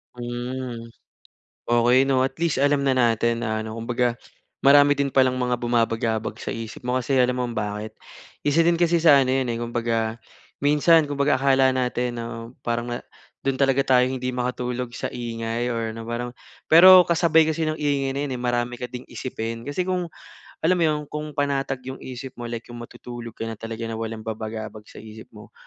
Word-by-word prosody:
Hmm. 120 -1 -5 0.8
Okey 120 +2 +4
'no 135 -1 +2
at - - -7
least 165 -5 +1
alam 140 +1 +2
na 140 - +2
natin 115 -1 +1
na 110 0 -1
ano 110 +1 -7
kumbaga 120 +1 -1 0.5
marami 145 0 +6
din 140 - +2
palang 130 -1 +2
mga 125 -1 0
bumabagabag 115 -2 0
sa - - -3
isip 115 -1 -7
mo 125 +1 0
kasi 130 +2 -1
alam 125 0 0
mo 125 - 0
kung 120 - -6
bakit? 105 0 -4 0.5
Isa 160 +3 +3
din 170 - +4
kasi 170 0 +2
sa 150 -4 +6
ano 130 - 0
iyan, 130 0 +1
eh, 115 -1 -2
kumbaga 115 -1 -1 0.4
minsan, 150 +2 +4
kumbaga 140 -1 +1
akala 135 -1 +4
natin 125 -1 -1
'no, 115 +1 -7
parang 120 0 -1
na 120 - -2 0.5
dun 135 - +2
talaga 135 -1 +2
tayo 125 -1 +5
hindi 130 -1 -3
makatulog 125 0 -3
sa - - -4
ingay 115 0 -3
or 115 -1 -3
na 115 - -6
parang 120 +1 -4 0.3
pero 180 +2 +9
kasabay 165 -2 +4
kasi 160 +1 -1
ng 155 0 -2
ingay 140 -2 0
na 135 +1 -3
iyon, 135 - -4
eh, 125 - -5
marami 120 0 -1
ka 125 0 -6
ding 125 0 -8
isipin. 115 -2 -5
Kasi 145 +8 -3
kung 180 -2 -2 0.5
alam 180 +3 +4
mo - - +2
iyon, 155 -2 +2
kung 150 -1 -5
panatag 135 -2 -1
yung 130 - -7
isip 130 0 -8
mo, 120 - -5
like 115 0 -5
yung 120 - -8
matutulog 120 -1 -9
ka - - -4
na 115 - -4
talaga 115 0 -5
na 115 0 -4
walang 110 -1 -5
babagabag 110 -1 -6
sa - - -15
isip 110 0 -11
mo, - - -14
125 Hz, 195 wpm, -23 LUFS, 115-140 Hz, 0.8 s, pero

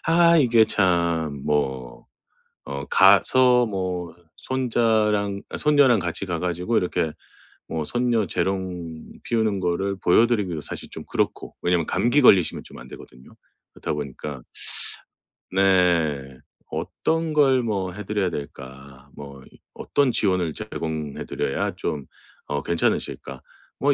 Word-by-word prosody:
아 170 0 +5
이게 120 -5 +5
참 85 -7 +1
뭐 65 -4 -2 0.6
어 70 0 -5
가서 125 +6 +5
뭐 90 -5 -4 0.2
손자랑 110 -5 0
아 - - -5
손녀랑 145 -6 +4
같이 90 +2 -3
가 85 -3 -3
가지고 90 +6 -1
이렇게 85 -3 0 0.6
뭐 80 -2 -3
손녀 120 -1 0
재롱 90 -4 -3 0.2
피우는 110 -4 0
거를 95 +2 -1
보여드리기도 100 -3 +2
사실 - - -7
좀 - - -8
그렇고. - - -2
왜냐하면 85 -2 +1
감기 130 +5 +2
걸리시면 95 - +4
좀 - - -13
안되거든요. 65 0 -13 0.4
그렇다 - - -4
보니까 70 -2 -6 1.1
네 85 -8 +2 0.3
'어떤 165 -1 -2
걸 135 -4 +4
뭐 100 -5 -2
해 105 +2 -8
드려야 100 -3 -1
될까.' 65 -1 -9
뭐 70 -2 -10 0.3
'어떤 140 -3 +1
지원을 90 -7 0
제공해 80 -3 -5
드려야 - - -2
좀 70 -4 -4 0.4
어 75 0 -2
괜찮으실까?' 85 -1 -2 0.4
뭐 140 +2 +3
90 Hz, 250 characters per minute, -23 LUFS, 80-115 Hz, 1.1 s, 아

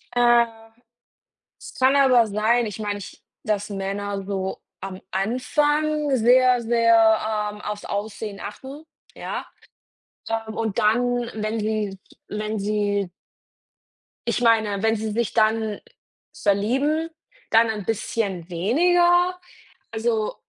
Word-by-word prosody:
Äh. 240 -1 +5 1.2
Es - - -10
kann 260 +1 +4
aber 255 -4 +5
sein, 220 +3 +2
ich 210 -1 -6
meine 205 -1 -3
ich 185 - -11 0.2
dass 210 0 -1
Männer 200 0 -3
so 190 -1 -3 0.2
am 190 -1 -7
Anfang 295 +8 +1
sehr, 250 +1 +4
sehr, 225 -2 +3
ähm, 210 - -11
aufs 210 0 -5
Aussehen 205 0 -5
achten, 270 +8 -8 0.3
ja? - - -5 0.8
Ähm, 225 -1 -3
und 220 -3 -2
dann, 245 +2 +1
wenn 215 +1 -2
sie 210 -2 -2 0.3
wenn 215 0 -3
sie 205 -2 -1 1.2
ich - - 0
meine, 220 -4 +3
wenn 225 0 +3
sie 215 0 -3
sich 230 -1 -1
dann 220 -1 +1 0.5
verlieben, 270 +11 0 0.4
dann 225 0 +5
ein 210 -4 -4
bisschen 200 -5 -2
weniger. 350 - +3 0.5
Also, 225 -1 -1
220 Hz, 115 wpm, -23 LUFS, 205-245 Hz, 1.2 s, Äh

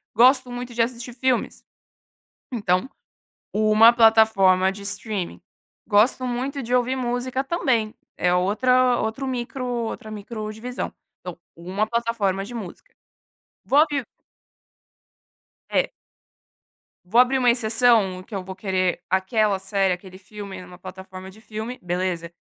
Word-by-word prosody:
"Gosto 255 +1 +5
muito 245 0 -6
de 235 - +1
assistir 235 +1 -3
filmes.", 255 0 -1 0.9
então 200 -2 0 0.6
uma 215 +2 +6
plataforma 220 -5 +5
de 200 - -11
streaming. 200 - -4 0.5
"Gosto 235 +5 +3
muito 260 +3 -3
de 245 +1 -2
ouvir 250 +1 +2
música 255 +1 -2
também.", 260 -9 0 0.2
é 180 - +1
outra 250 +7 +3
outro 230 +5 -3
micro 255 0 -4
outra 235 -3 -4
microdivisão. 215 +3 -5 0.3
Então - - -8 0.2
uma 185 +5 -2
plataforma 225 -4 -1
de 240 - -9
música. 225 - -9 0.7
Vou 280 - +3
abrir 295 -3 +3 1.7
É. - - +1 1.1
Vou 225 +7 +3
abrir 255 +2 +2
uma 250 -2 +3
exceção 225 -5 +2
que 205 - -9
eu 190 - -3
vou 190 0 -8
querer 185 -2 -1
aquela 195 +2 +2
série, 195 0 0
aquele 185 +1 -10
filme 195 -1 -9
numa 180 0 -12
plataforma 190 +1 -10
de 210 - -17
filme, 220 +3 -6
beleza, 175 -1 -2
220 Hz, 125 wpm, -23 LUFS, 190-245 Hz, 1.7 s, uma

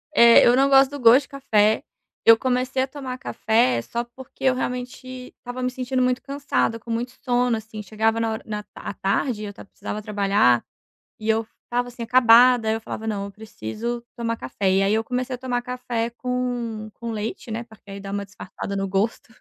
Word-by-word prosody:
Eh, 235 -2 +8
eu 240 - +6
não 270 +2 +4
gosto 270 0 +6
do 285 - -6
gosto 245 +3 +7
de - - -16
café. 220 -6 +2 0.4
Eu 225 0 +9
comecei 255 +1 0
a - - -2
tomar 260 -2 -6
café 215 - +1
só 235 - -3
porque 255 +2 -14
eu 260 -1 +4
realmente 250 0 -5
estava 245 +1 -6
me 250 - +1
sentindo 255 0 -2
muito 250 0 +1
cansada, 280 -4 -1
com 230 - -8
muito 235 +2 -2
sono, 245 -2 +2
assim, 220 -1 -7
chegava 220 +2 0
na 225 -1 0
hora 220 - -6
na 210 -1 -5
à - - -6
tarde 210 +4 -1
eu 205 - -7
tav - - -12
precisava 210 +1 -6
trabalhar, 200 - +3 0.6
e 215 - -5
eu 220 0 +1 0.2
estava, 245 0 -1
assim, 245 -1 -7
acabada, 240 0 +6
aí 220 - +2
eu 225 - -3
falava: 220 0 -6
"Não, 205 -2 -2
eu 200 - -8
preciso 220 - -5
tomar 230 -1 -2
café". 190 +7 -2
E 190 +1 +3
aí 200 +2 +2
eu 220 +1 +1
comecei 250 +2 -2
a - - -10
tomar 250 -1 -2
café 245 -2 -3
com 240 -3 -3
com 235 -1 -5
leite, 220 +2 -5
né, 225 +1 -3
porque 220 -3 -16
aí 200 - -7
dá 195 0 -7
uma 200 0 -3
disfarçada 200 0 -7
no 195 0 -1
gosto. 205 +4 -2
230 Hz, 205 wpm, -23 LUFS, 215-250 Hz, 0.6 s, Eu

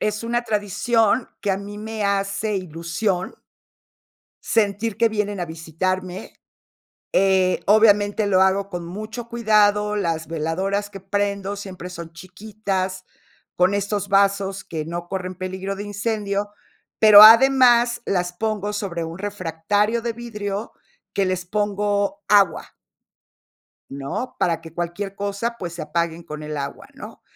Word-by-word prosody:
Es 215 +1 -1
una 240 +1 -1
tradición 220 +2 +1
que 205 - -1
a 190 - +1
mí 200 +1 -8
me 220 -1 -4
hace 200 +2 0
ilusión 175 +2 -3 1.1
sentir 215 0 0
que 230 - +3
vienen 205 -2 -2
a - - 0
visitarme, 180 +3 -4 0.8
eh, 190 -1 +3
obviamente, 210 0 +4
lo 190 -2 +4
hago 195 +1 +2
con 175 -3 -5
mucho 215 +6 -7
cuidado, 210 -3 +2
las 165 -5 -1
veladoras 190 +6 -2
que 195 - -9
prendo 200 +1 -2
siempre 185 -3 -8
son 170 -2 -9
chiquitas, 185 0 -4 0.5
con 180 +2 +3
estos 200 0 -2
vasos 195 0 +2
que 155 -2 -5
no 175 +1 -6
corren 185 -1 -4
peligro 190 +2 -5
de 205 - -5
incendio, 205 -1 -2 0.5
pero 210 -1 +10
además 240 0 +7
las 180 -2 -1
pongo 210 0 -2
sobre 185 -5 -3
un 165 +2 -6
refractario 205 +3 -1
de 235 0 -2
vidrio 210 -3 -5 0.4
que 195 - +2
les 185 -1 -2
pongo 205 +6 -1
agua 200 -3 +3 1.2
¿no?, 140 - -5
para 165 -2 +1
que 165 -1 -12
cualquier 175 +3 -4
cosa, 205 +4 -3
pues, 175 -2 -5
se 170 - -6
apaguen 170 +2 -2
con 155 -2 -8
el 150 0 -5
agua, 140 -1 -5
¿no? - - -11
200 Hz, 135 wpm, -22 LUFS, 180-210 Hz, 1.2 s, pero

